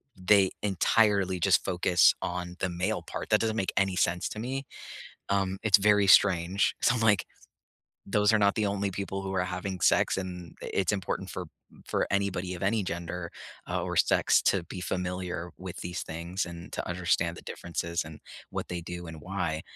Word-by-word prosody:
they 95 +1 +4
entirely 100 -1 +2
just - - +3
focus 90 -2 +4
on 90 0 -4
the 95 - 0
male 90 +5 -1
part. - - -6
That 105 - +4
doesn't 110 -1 0
make 95 - -1
any 95 -1 +2
sense 85 0 +1
to 105 - -7
me. 135 +4 -3 0.7
Um, 95 -1 0
it's 105 -2 +6
very 105 0 +4
strange. 95 0 +4
So, 120 - +4
I'm 120 - -1
like, 105 -4 +3 0.8
those 105 +2 +3
are 110 - +4
not 100 -1 +3
the 110 - +1
only 100 0 -1
people 95 +1 -4
who 95 0 -4
are 90 -1 +1
having 90 +1 -4
sex, - - +3
and 90 -3 -6
i - - -5
it's 95 -3 +2
important 95 -2 -3
for - - -5 0.4
for - - 0
anybody 95 -2 -1
of 90 - -9
any 105 +2 +1
gender, 85 -1 -5 0.4
uh, - - -1
or - - -3
sex - - +4
to 95 - +2
be 90 - -7
familiar 90 -1 -3
with 95 -1 -8
these 90 +1 -4
things 85 +4 -4
and 85 +1 -9
to - - -3
understand 85 -1 0
the - - -9
differences 85 +1 -3
and 80 -1 -11 0.3
what - - -4
they 90 -1 -3
do 85 +1 -7
and 80 -2 -9
why. 85 -3 -2
95 Hz, 190 wpm, -28 LUFS, 90-100 Hz, 0.8 s, it's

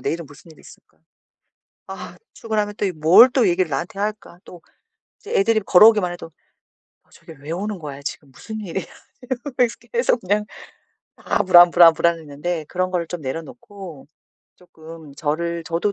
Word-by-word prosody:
'내일은 165 +5 -4
무슨 145 +4 -17
일이 160 - -18
있을까? - - -19 0.9
아 - - -9 0.2
출근하면 210 -2 -3
또 - - -2
이 190 - -2
뭘 165 +10 +6
또 245 -7 +2
얘기를 180 0 0
나한테 170 +7 -4
할까?' 205 -3 -5
또 175 - -13 0.6
이제 445 - -9
애들이 230 - +2
걸어오기만 210 -1 +5
해도 175 -1 -10 0.8
'저게 - - -15
왜 145 +3 -9
오는 200 +3 -4
거야. 145 -3 -8
지금 140 0 -7
무슨 220 - -9
일이야?' 190 -2 -5 0.4
이러면서 250 -1 -2 0.2
계속 475 - +1
그냥 205 +3 -1 0.7
아 - - -1
불안, 175 -1 +7
불안, 170 -1 +7
불안했는데 165 0 -2
그런 185 0 -2
거를 175 -2 -2
좀 175 0 -7
내려놓고 165 - -9 0.5
쪼끔 160 -4 -14
저를 170 +3 -3
저도 170 +5 -2
175 Hz, 330 characters per minute, -21 LUFS, 160-210 Hz, 0.9 s, 불안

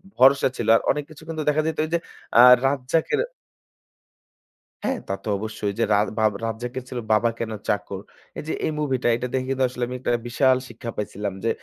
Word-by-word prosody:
ভরসা 135 +2 +6
ছিল। 115 - -3
আর - - +3
অনেক 150 - -2
কিছু 155 0 -13
কিন্তু 160 -1 -4
দেখা 150 +1 +2
যাইতো 160 -1 0
এইযে 170 +2 0 0.4
অ্যা 120 - +9 0.3
রাজ্জাকের 140 +3 0 1.6
হ্যাঁ, 265 -1 0
তা 95 - -2
তো - - -9
অবশ্যই। 110 0 -3
যে - - +3
রাজ 105 +1 +2
বাব 110 -1 +4
রাজ্জাকের 120 +3 -4
ছিল 125 - -4
'বাবা 110 +2 +4
কেন 115 -1 -3 0.2
চাকর?' 100 -1 -2 0.4
এই - - -5
যে - - -1
এই - - 0
মুভি 140 -4 0
টা - - +3
এটা 125 +1 -3
দেখে 130 -1 -1
কিন্তু 135 0 +1
আসলে 125 0 -4
আমি 125 - -5
একটা 125 - -1 0.2
বিশাল 130 +2 +3
শিক্ষা 120 0 -7
পাইছিলাম, 105 -1 -3
যে 115 - +1
125 Hz, 195 wpm, -24 LUFS, 110-140 Hz, 1.6 s, অ্যা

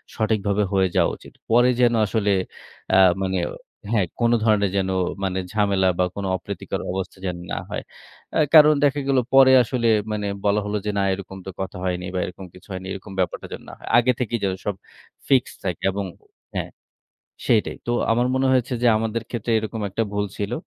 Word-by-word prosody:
সঠিকভাবে 105 -2 +1
হয়ে 95 -1 +3
যাওয়া - - +3
উচিত। - - -15 0.2
পরে 120 +2 +5
যেন 120 -1 +4
আসলে 105 0 0 0.6
অ্যা 95 - +5 0.2
মানে 95 -1 0 0.5
হ্যাঁ, 105 -6 +2
কোন 120 0 +3
ধরণের 105 -3 +3
যেন 95 -1 0 0.3
মানে 95 -1 -1
ঝামেলা 100 -3 +2
বা 90 - +4
কোন 100 - -4
অপ্রীতিকর 95 +1 -5
অবস্থা 95 0 -4
যেন 90 -2 -2 0.2
না - - -2
হয়। - - -4 0.7
কারণ 155 -1 +9
দেখা 145 0 +3
গেল 135 -1 +2 0.2
পরে 135 -1 +8
আসলে, 120 +1 -1 0.2
মানে 105 -1 -2 0.2
বলা 100 +1 +3
হলো 105 +1 -1
যে, 105 - 0
না, - - +2
এরকম 95 0 -7
তো - - -5
কথা 95 -1 -5
হয়নি 90 0 -2
বা - - +1
এরকম 95 +1 -8
কিছু 90 +3 -16
হয়নি। 95 0 -6
এরকম 100 +1 -9
ব্যাপারটা 90 - -1
যেন - - -7
না - - -10
হয়। - - -13
আগে 120 +1 +4
থেকেই 120 -1 -1
যেন 95 -1 +1
সব 105 - -1 0.5
ফিক্সড 130 -3 +2
থাকে 90 -4 -3
এবং 100 +1 -3 0.5
হ্যাঁ, - - -2 0.8
সেইটাই। 110 -2 +2
তো - - -1 0.2
আমার 120 +2 +2
মনে 130 0 +2
হয়েছে 130 0 +1
যে, - - +4
আমাদের 115 +1 -2
ক্ষেত্রে 120 -1 -3
এরকম 110 +1 -4
একটা 115 +4 -1
ভুল 105 0 0
ছিল। 105 +3 -2
105 Hz, 190 wpm, -23 LUFS, 95-120 Hz, 0.8 s, কারণ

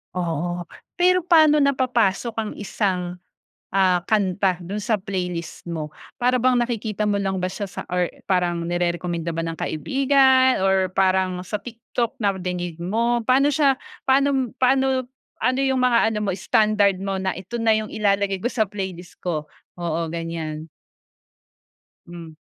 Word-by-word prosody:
Oo. 175 0 -2 0.3
Pero 365 0 +4
paano 310 -4 +6
napapasok 245 -5 +1
ang 215 -1 -3
isang, 180 -2 -2 0.6
ah, 185 -2 +4
kanta 195 -3 +2
dun 200 +4 -4
sa 220 0 +1
playlist 180 -4 -5
mo? 155 -2 -4 0.2
Para 250 0 +2
bang 255 0 +3
nakikita 225 -3 -1
mo 205 -1 +1
lang 195 -1 -1
ba 185 - -1
siya 200 +1 -5
sa - - -6
or 180 -1 +1 0.2
parang 175 -3 0
nire-rekomenda 170 -1 -2
ba 165 0 -2
ng 165 0 -5
kaibigan 265 - +3
or 190 -1 +3
parang 185 -1 +1
sa 210 +2 -4
TikTok 235 +1 -4
na 200 -1 +3
dinig 175 -2 -4
mo. 230 +6 +1
Paano 275 +3 +4
siya, 275 -3 +3 0.3
paano 270 -2 +3
paano, 265 0 +2 0.4
ano 255 +1 +2
yung 265 -1 +1
mga 245 -2 +4 0.2
ano 210 - -1
mo 195 - 0
standard 205 0 +2
mo 195 -1 -2
na 190 -2 -2
ito 195 +6 -6
na 225 -1 +4
yung 215 -1 -3
ilalagay 200 -2 +1
ko 240 - 0
sa 225 -4 +1
playlist 190 -3 -7
ko? 155 -4 -2 0.3
Oo, 170 -1 -2
ganyan. 165 -1 -5 1.4
Hmm. 170 -2 -10
195 Hz, 150 wpm, -23 LUFS, 175-240 Hz, 1.4 s, paano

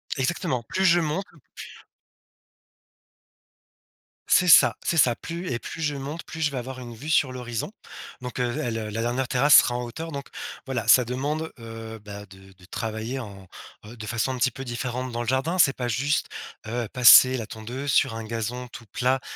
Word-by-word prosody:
Exactement, 135 -2 -1
plus 190 +10 -1
je 175 -1 +5
monte, 165 +5 -2 0.3
p - - -8 2.7
C'est 180 -1 +5
ça, - - +8
c'est 170 - 0
ça. 120 -5 +4
Plus 170 +2 -6
et 120 - -1
plus 165 - -8
je 150 -2 -1
monte, 145 +5 -6
plus 160 - -8
je 145 -2 +1
vais 135 - -5
avoir 130 +1 -6
une 120 -2 -8
vue 140 +8 -8
sur 145 -5 +3
l'horizon, 120 - -5 0.5
donc 125 0 -6
heu, 120 -1 0
le 120 - -2
la 110 -1 -4
la 115 +2 -3
dernière 120 +2 -1
terrasse 140 +3 +5
sera 120 - +6
en 125 - -2
hauteur, 160 +8 -6
donc 140 -1 -6 0.4
voilà, 130 -4 -3
ça 125 -2 +7
demande, 145 +6 -3
heu, 115 0 -8
bah, 105 0 -9
de 95 0 -16 0.2
travailler 110 +4 -4
en, 100 -5 -10 0.4
heu, 115 +3 -11
de 110 -2 -8
façon 120 +3 -1
un - - -4
petit 130 0 +2
peu 135 +2 -8
différente 125 +1 -4
dans 120 - -2
le 120 - -5
jardin. 140 +8 0
C'est 140 - +6
pas 125 -1 -3
juste, 140 +5 0 0.4
heu, 115 0 -3
passer 130 +1 +8
la 110 - -5
tondeuse 125 +5 -5
sur 120 -4 +3
un 115 -1 -6
gazon 115 +3 -4
tout 120 -1 -11
plat, 130 +1 +1
125 Hz, 195 wpm, -25 LUFS, 115-140 Hz, 2.7 s, ça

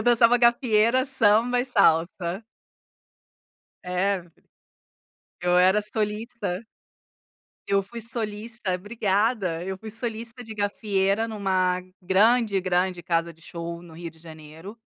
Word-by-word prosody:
eu - - -2
dançava 240 0 +5
gafieira, 235 0 +3
samba 245 -1 +3
e - - -1
salsa. 185 -3 +1 1.4
É. 185 +2 0 1.2
Eu 180 0 +2
era 190 +3 +5
solista. 210 -1 -3 1.0
Eu 200 0 +2
fui 230 +5 -9
solista 220 -2 -2
obrigada! 200 -2 0
Eu 190 0 -4
fui 220 +2 -9
solista 230 +1 -5
de 220 -2 -9
gafieira 205 0 0
numa 185 -4 0 0.2
grande, 200 +2 +3
grande 180 -1 0
casa 170 0 0
de 165 0 -24
show 170 0 -7
no 170 -2 -14
Rio 170 0 -7
de 160 - -22
Janeiro. 160 +5 -12
200 Hz, 115 wpm, -25 LUFS, 180-230 Hz, 1.4 s, dançava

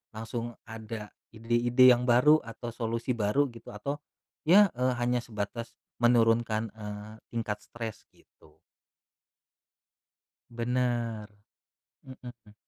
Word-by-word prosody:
Langsung 115 +1 -5
ada 110 -1 -7 0.2
ide-ide 120 +3 +4
yang 125 0 +2
baru 125 +6 +6
atau 115 +1 -7
solusi 115 +2 -2
baru 115 +7 +2
gitu 115 - -12
atau 140 +8 -4 0.5
ya, 195 +3 +7
eee, 125 +1 +1
hanya 125 0 +1
sebatas 115 +1 -6 0.2
menurunkan, 115 -2 +3
eee, 105 0 -8
tingkat 110 -3 -3
stres, 115 -2 -7
gitu. - - -24 1.9
Benar. 120 -2 -1 0.8
Mhm. 120 -5 -12
115 Hz, 100 wpm, -29 LUFS, 110-125 Hz, 1.9 s, ya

